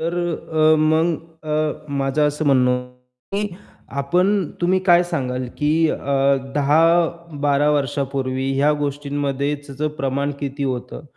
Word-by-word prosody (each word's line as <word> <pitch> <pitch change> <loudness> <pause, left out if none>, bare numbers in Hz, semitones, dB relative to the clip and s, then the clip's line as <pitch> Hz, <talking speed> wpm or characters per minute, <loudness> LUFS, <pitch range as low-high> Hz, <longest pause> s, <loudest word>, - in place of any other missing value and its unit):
तर 165 +2 -2
अ, 160 -2 +1
मग 160 +2 +3 0.3
अ, 155 0 -2
माझं 135 +2 +1
असं 150 +1 -2
म्हणणं 130 -3 +4
होतं 125 +5 -6
की 210 - -1 0.5
आपण 180 +8 +2 0.3
तुम्ही 180 +2 +3
काय 175 -2 +6
सांगाल, 130 -7 -3
की 155 +2 +2 0.7
10-12 155 -1 +2
वर्षापूर्वी 135 -2 -1
ह्या 140 +2 +3
गोष्टींमध्ये 140 0 -2
त्याचं 145 +1 -4
प्रमाण 140 +1 -1
किती 140 0 -3
होतं 130 +2 -4
145 Hz, 120 wpm, -21 LUFS, 135-160 Hz, 0.7 s, काय